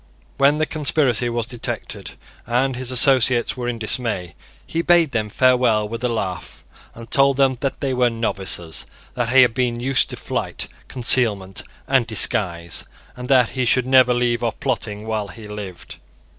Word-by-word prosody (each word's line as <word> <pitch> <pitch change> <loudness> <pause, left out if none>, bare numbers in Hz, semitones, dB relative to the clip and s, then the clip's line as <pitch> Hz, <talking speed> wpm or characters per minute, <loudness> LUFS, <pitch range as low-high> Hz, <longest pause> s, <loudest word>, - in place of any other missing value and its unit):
When 140 +2 +3
the 155 - 0
conspiracy 140 -6 +2
was 120 -1 -3
detected 120 -1 -6 0.3
and 125 +2 0
his 125 0 -4
associates 125 -2 +4
were 125 -1 -5
in 120 - -4
dismay, 110 -6 -1 0.3
he 165 - -3
bade 170 -3 +3
them 110 -4 -2
farewell 125 -3 +2
with 115 +3 -7
a 125 - 0
laugh, 95 -6 -5 0.3
and 115 0 -12
told 135 -1 +3
them 135 -2 +2
that 135 0 -4
they 135 -2 -1
were 125 -1 +2
novices, 95 -7 -2 0.3
that 120 -2 -2
he 130 +1 +6
had 120 - +1
been 120 -1 -2
used 130 +1 0
to - - -3
flight, - - -4 0.2
concealment 110 -6 +3 0.3
and 130 -4 +1
disguise, 85 -6 +1 0.3
and 125 0 -9
that 130 -3 +4
he 130 - -3
should 125 +1 +2
never 130 -1 +4
leave 120 -1 0
off 115 - -3
plotting 105 -1 -3
while 110 -2 -3
he 110 +1 -11
lived. 105 -4 -9
120 Hz, 170 wpm, -20 LUFS, 110-130 Hz, 0.3 s, he